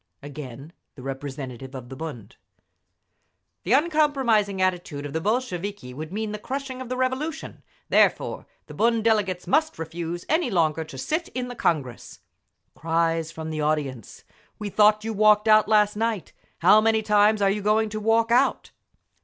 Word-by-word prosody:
Again 145 +1 -9 0.2
the 130 - -11
representative 135 -1 -6
of 125 -2 -8
the 135 - -8
Bund. 130 -9 -8 1.3
The 200 - 0
uncompromising 270 - +2
attitude 175 -6 -1
of 145 - -6
the 160 - -2
Bolsheviki 205 - -3
would 155 +4 -7
mean 215 +1 -3
the 210 - -5
crushing 265 +2 -5
of 255 - -7
the 255 - -3
Revolution; 265 +5 -3 0.3
therefore, - - +2 0.2
the - - -11
Bund 230 0 +1
delegates 205 -5 +1
must 315 +3 +1
refuse 165 +1 -5
any 315 -3 +1
longer 160 -5 +1
to 145 -4 -11
sit 315 - -2
in 250 -1 -3
the 245 - -7
Congress. 140 - -2 0.5
Cries 165 0 0
from 160 -1 -6
the 155 -1 -3
audience, 145 -7 -3 0.3
"We 210 -1 -5
thought 210 +1 +4
you 225 0 -3
walked 210 +1 +4
out 215 0 +6
last 210 -1 +3
night! 220 -4 -2 0.3
How 205 +5 +7
many 220 0 +2
times 210 0 +4
are 200 -1 +3
you 205 +1 -2
going 215 +2 +2
to 215 0 -4
walk 225 +2 +2
out?" 255 +3 +2
205 Hz, 160 wpm, -24 LUFS, 155-225 Hz, 1.3 s, How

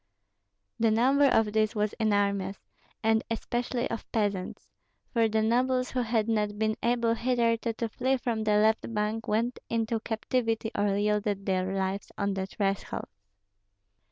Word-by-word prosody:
The 225 0 +4
number 260 +6 +4
of 220 -6 +3
these 215 0 +1
was 210 0 0
enormous, 200 -2 +1 0.5
and 220 0 +3
especially 240 +2 -2
of 230 - -6
peasants; 205 -4 -2 0.5
for 230 -2 +3
the 220 0 +1
nobles 255 +3 +1
who 255 - 0
had 225 -2 0
not 210 -2 0
been 215 0 +1
able 235 -1 +2
hitherto 230 -1 +1
to 230 +1 -2
flee 260 +4 0
from 230 -3 -2
the 210 -1 +3
left 220 +2 +2
bank 215 +2 -1
went 230 +3 0
into 225 0 0
captivity 225 0 -1
or 200 -1 +1
yielded 205 -1 0
their 185 -1 0
lives 190 +1 -2
on 200 -1 0
their 190 0 -3
thresholds. 195 - -3
220 Hz, 150 wpm, -28 LUFS, 205-230 Hz, 0.5 s, The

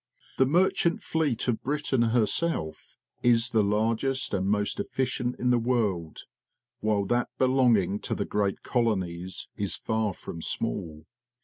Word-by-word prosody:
The 130 - +5
merchant 175 +2 +2
fleet 150 -9 -1
of 120 -3 0
Britain 140 -2 0
herself 115 - 0 0.2
is 120 0 +3
the 110 -2 +3
largest 115 +6 0
and 95 -1 0
most 105 0 0
efficient 125 -1 -2
in 125 0 +1
the 120 - +3
world, 105 -9 -1 0.6
while 105 -2 +1
that 120 +5 0
belonging 120 -7 +3
to - - -3
the - - -2
great 100 -2 -1
colonies 95 -7 -1
is 100 -4 0
far 110 -3 -1
from 85 - -8
small. 80 -1 -3
115 Hz, 135 wpm, -27 LUFS, 100-130 Hz, 0.6 s, The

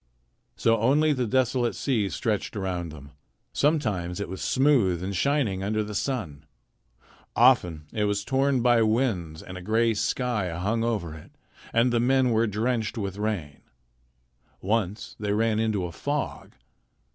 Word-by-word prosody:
So 115 -1 +2
only 145 +7 +3
the 125 -3 -1
desolate 125 0 +1
sea 110 -8 0
stretched 110 +1 -2
around 90 -4 -3
them. 70 -2 -12 0.4
Sometimes 105 - 0
it 100 - -4
was 95 0 -6
smooth 120 - +2
and 95 +1 -3
shining 130 -7 +1
under 110 +2 0
the 105 0 -7
sun. 95 - -3 0.9
Often 80 -3 +4
it 105 -1 0
was 105 0 -1
torn 135 -2 +1
by 120 -2 +4
winds, 110 -9 0
and 90 0 -8
a - - -10
gray 115 +4 +2
sky 110 -2 -1
hung 110 +6 0
over 105 -9 -2
it, 80 -1 -12 0.4
and 120 +2 +2
the 120 - +3
men 130 +1 +3
were 115 +1 +2
drenched 110 +2 -1
with 100 -2 -4
rain. 100 -9 -3 1.0
Once 105 0 -2
they 105 -1 -1
ran 110 0 +1
into 110 -4 0
a 85 - -5
fog. 145 - -4
110 Hz, 150 wpm, -26 LUFS, 95-125 Hz, 1.0 s, Often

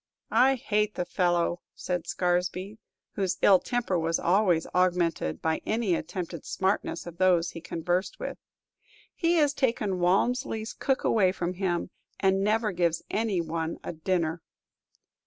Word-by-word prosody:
"I 255 +4 +5
hate 210 -4 0
the 180 - -2
fellow," 175 -1 +1
said 180 -2 -3
Scaresby, 180 +3 -1 0.3
whose 190 -3 -1
ill 190 -2 +7
temper 235 -7 -1
was 165 0 +1
always 180 -3 +2
augmented 175 - +1
by 160 0 0
any 220 -4 0
attempted 170 0 -4
smartness 190 -3 -1
of 170 -1 -10
those 180 -3 +3
he 165 - -8
conversed 175 +3 -2
with. - - -5 0.7
"He 340 -1 +1
has 295 -3 +3
taken 225 -9 0
Walmsley's 220 +4 +1
cook 270 -1 -1
away 190 -5 +3
from 180 -1 -3
him, 180 -2 -2 0.3
and 195 0 +2
never 215 +1 +1
gives 170 -2 0
any 210 -5 0
one 165 0 -3
a - - -5
dinner." 165 0 -1
185 Hz, 140 wpm, -28 LUFS, 170-210 Hz, 0.7 s, ill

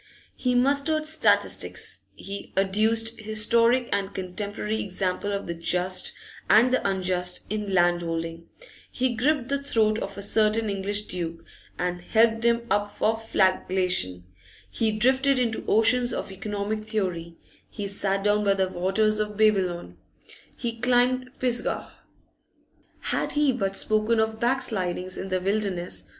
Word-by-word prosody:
He 250 -1 0
mustered 285 +5 +2
statistics; 315 +1 +1
he 200 +1 -8
adduced 220 +4 +1
historic 230 +3 +3
and 200 -1 -2
contemporary 205 +3 -3
example 190 +1 -2
of 200 0 -3
the 170 - -4
just 180 +2 0 0.4
and 245 +4 +5
the 255 - +2
unjust 180 -1 -1
in 210 -2 -3
land 175 -1 +3
holding; 165 0 -4 0.4
he 255 -1 0
gripped 270 +2 +1
the 280 0 0
throat 220 -5 +1
of 200 0 -6
a 200 - -5
certain 215 +1 +2
English 200 +1 -1
duke, 170 -4 -4 0.3
and 180 0 -2
held 225 +4 +2
him 235 0 +2
up 205 0 +1
for 220 +2 0
flagellation; 185 - 0 0.5
he 220 -1 0
drifted 260 +5 +3
into 235 -3 -1
oceans 240 +3 +4
of - - -4
economic 205 +2 -3
theory; 185 -6 -3 0.3
he 205 -2 -5
sat 195 0 -1
down 210 0 +2
by 200 -1 +3
the 190 -1 0
waters 200 +4 +1
of 210 -1 -3
Babylon; 185 - +1 0.6
he 230 -1 -4
climbed 250 +1 +2
Pisgah. 245 -2 -1 1.1
Had - - -1
he 295 -2 +3
but 195 -6 -2
spoken 215 +2 +2
of 220 0 0
backslidings 190 -8 -1
in 190 - -5
the 185 0 0
wilderness! 195 -2 -2
210 Hz, 135 wpm, -25 LUFS, 185-230 Hz, 1.1 s, and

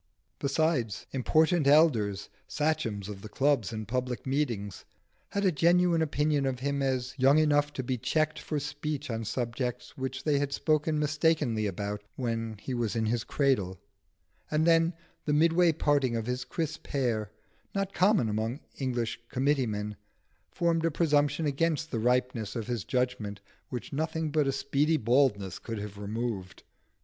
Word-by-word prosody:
Besides, 140 - 0
important 155 +4 +2
elders, 120 -10 +4 0.2
sachems 115 -10 -1
of 100 -2 -7
the 110 - -8
clubs 135 -6 +1
and 110 -2 -5
public 125 +1 -2
meetings, 125 -8 -2 0.5
had 200 0 -1
a 190 - +5
genuine 170 +1 +3
opinion 150 -2 +1
of 130 -2 -2
him 140 +1 -1
as 130 -1 -1
young 135 +3 +6
enough 145 -1 +3
to 130 - -3
be 125 0 -2
checked 155 +5 0
for 150 - -2
speech 145 -1 -4
on 115 0 -3
subjects 120 +1 -3
which 130 0 -4
they 145 -2 +2
had 140 -1 -1
spoken 155 0 +1
mistakenly 150 -7 +1
about 100 +2 -3
when 115 -3 -3
he 125 +6 -5
was 120 -3 -1
in 110 -1 +1
his 115 +1 0
cradle; 105 -11 0 0.7
and 155 +1 +2
then, 165 0 +4 0.3
the 150 - +1
midway 165 +3 +4
parting 145 -5 +1
of 115 -1 -2
his 125 +1 -2
crisp 160 -2 -4
hair, 115 -7 0 0.5
not 195 0 -1
common 195 - +3
among 110 +5 -2 0.2
English 125 -4 -2
committee 135 0 +1
men, 105 0 -3 0.6
formed 170 -1 +1
a 165 - +3
presumption 150 -1 +2
against 155 +2 0
the 115 - -1
ripeness 125 -2 0
of 115 -3 -3
his 120 -4 -2
judgment 120 -1 -1 0.3
which 125 +2 -6
nothing 160 +1 -1
but 150 -2 +2
a - - +2
speedy 145 +3 +1
baldness 115 - +2
could 115 -1 -5
have 105 -1 -7
removed. 105 -3 -4
135 Hz, 160 wpm, -29 LUFS, 115-155 Hz, 0.7 s, young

